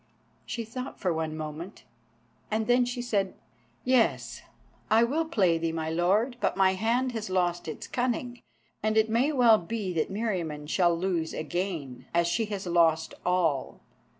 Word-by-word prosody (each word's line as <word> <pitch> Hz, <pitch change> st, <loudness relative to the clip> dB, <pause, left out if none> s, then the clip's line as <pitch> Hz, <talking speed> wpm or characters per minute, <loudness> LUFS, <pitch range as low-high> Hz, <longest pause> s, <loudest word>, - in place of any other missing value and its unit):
She 230 Hz, -2 st, -4 dB
thought 255 Hz, +4 st, -7 dB
for 180 Hz, -3 st, 0 dB
one 160 Hz, -1 st, -3 dB
moment, 155 Hz, +5 st, -7 dB, 0.7 s
and 220 Hz, +1 st, 0 dB
then 245 Hz, +1 st, +4 dB
she 245 Hz, 0 st, -3 dB
said: 200 Hz, -5 st, 0 dB, 0.5 s
"Yes, 255 Hz, -2 st, +2 dB, 0.5 s
I 225 Hz, +1 st, +5 dB
will 300 Hz, +7 st, +1 dB
play 185 Hz, -, +2 dB
thee, 165 Hz, 0 st, -1 dB
my 160 Hz, -1 st, -3 dB
Lord, 200 Hz, +9 st, +1 dB
but -, -, 0 dB
my 190 Hz, -1 st, +4 dB
hand 235 Hz, +6 st, +1 dB
has 220 Hz, -4 st, -4 dB
lost 175 Hz, -2 st, 0 dB
its 155 Hz, -, -6 dB
cunning, 245 Hz, 0 st, -2 dB, 0.4 s
and 215 Hz, +1 st, +1 dB
it 220 Hz, 0 st, +3 dB
may 250 Hz, +7 st, +3 dB
well 240 Hz, -6 st, +6 dB
be 195 Hz, +1 st, -3 dB
that 160 Hz, -2 st, 0 dB
Meriamun 180 Hz, -9 st, -2 dB
shall 175 Hz, 0 st, +2 dB
lose 170 Hz, -3 st, -1 dB
again, 160 Hz, -6 st, -4 dB
as 170 Hz, 0 st, +4 dB
she 220 Hz, +7 st, +1 dB
has 205 Hz, -2 st, -5 dB
lost 165 Hz, -2 st, +2 dB
all. 170 Hz, -7 st, +1 dB
190 Hz, 160 wpm, -28 LUFS, 170-230 Hz, 0.7 s, well